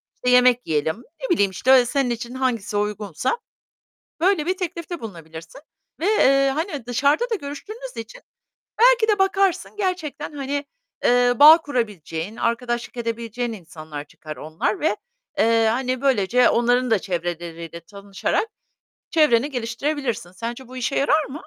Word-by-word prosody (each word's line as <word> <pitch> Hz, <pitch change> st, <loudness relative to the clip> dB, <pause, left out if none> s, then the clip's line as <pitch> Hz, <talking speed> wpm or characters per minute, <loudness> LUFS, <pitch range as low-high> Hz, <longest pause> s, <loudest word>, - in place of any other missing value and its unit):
işte 250 Hz, -, -2 dB
yemek 250 Hz, 0 st, +4 dB
yiyelim. 160 Hz, +8 st, -1 dB, 0.2 s
Ne -, -, -3 dB
bileyim, 200 Hz, -, +3 dB
işte, 255 Hz, +6 st, +4 dB
senin 265 Hz, 0 st, 0 dB
için 240 Hz, +1 st, -4 dB
hangisi 240 Hz, -6 st, -1 dB
uygunsa 210 Hz, -, -2 dB, 0.8 s
böyle 355 Hz, -2 st, +2 dB
bir 370 Hz, +2 st, -1 dB
teklifte 345 Hz, -1 st, -5 dB
bulunabilirsin 165 Hz, -, -10 dB, 0.4 s
ve, 335 Hz, -, -2 dB
eee, 275 Hz, -10 st, +4 dB
hani, 310 Hz, -, -3 dB
dışarıda 280 Hz, -, +1 dB
da 455 Hz, -, 0 dB
görüştüğünüz 425 Hz, -, -8 dB
için -, -, -8 dB, 0.6 s
belki 485 Hz, -1 st, +5 dB
de 420 Hz, -2 st, +2 dB
bakarsın 385 Hz, -1 st, +1 dB
gerçekten, 360 Hz, -7 st, -3 dB
hani, 280 Hz, 0 st, -3 dB, 0.4 s
eee, 245 Hz, 0 st, +4 dB
bağ 310 Hz, +3 st, +10 dB
kurabileceğin, 210 Hz, -, -4 dB
arkadaşlık 240 Hz, +1 st, -2 dB
edebileceğin 230 Hz, 0 st, -3 dB
insanlar 155 Hz, -6 st, -9 dB
çıkar 155 Hz, +1 st, -10 dB
onlar 160 Hz, +7 st, -2 dB
ve, 210 Hz, -, +1 dB, 0.4 s
eee, 225 Hz, 0 st, +4 dB
hani, 255 Hz, +2 st, -1 dB
böylece 250 Hz, -2 st, +3 dB
onların 245 Hz, +1 st, +2 dB
da 220 Hz, -, +4 dB
çevreleriyle 170 Hz, -2 st, -5 dB
tanışarak 200 Hz, -, -3 dB, 0.6 s
çevreni 295 Hz, -5 st, +3 dB
geliştirebilirsin. 245 Hz, -, -3 dB
Sence 235 Hz, +6 st, -6 dB
bu 255 Hz, +1 st, -10 dB
işe 255 Hz, +2 st, -2 dB
yarar 300 Hz, +2 st, +2 dB
mı? 260 Hz, -, -10 dB
245 Hz, 135 wpm, -22 LUFS, 210-300 Hz, 0.8 s, bağ